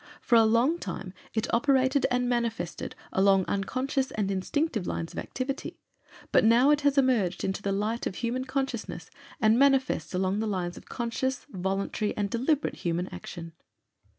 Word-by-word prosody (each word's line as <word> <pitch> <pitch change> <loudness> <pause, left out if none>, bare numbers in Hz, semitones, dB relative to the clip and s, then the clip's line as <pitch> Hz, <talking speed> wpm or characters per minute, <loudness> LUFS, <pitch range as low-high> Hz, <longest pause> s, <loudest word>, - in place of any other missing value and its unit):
For - - -3
a 225 -1 +7
long 240 +10 +3
time 185 - -6 0.2
it 220 +1 -1
operated 265 +2 +3
and 250 0 +1
manifested 235 -8 -2 0.2
along 195 -1 +4
unconscious 260 +7 -1
and 200 -2 -1
instinctive 215 - -1
lines 165 - -3
of - - -4
activity, 270 +1 -4 0.5
but - - +5
now 235 +6 +5
it 295 0 +3
has 285 -1 +2
emerged 230 -10 +2
into 190 +1 -2
the 200 - -1
light 215 +4 -1
of 190 - -5
human 250 +2 -2
consciousness 265 -3 -3 0.3
and 225 -1 +4
manifests 270 -7 +2
along 190 +2 0
the 220 - -1
lines 180 -3 -2
of - - -13
conscious, 250 +2 -2
voluntary, 195 +2 -2
and 200 -2 -1
deliberate 270 +5 0
human 175 +1 -2
action. 165 -2 -8
230 Hz, 160 wpm, -28 LUFS, 195-260 Hz, 0.5 s, a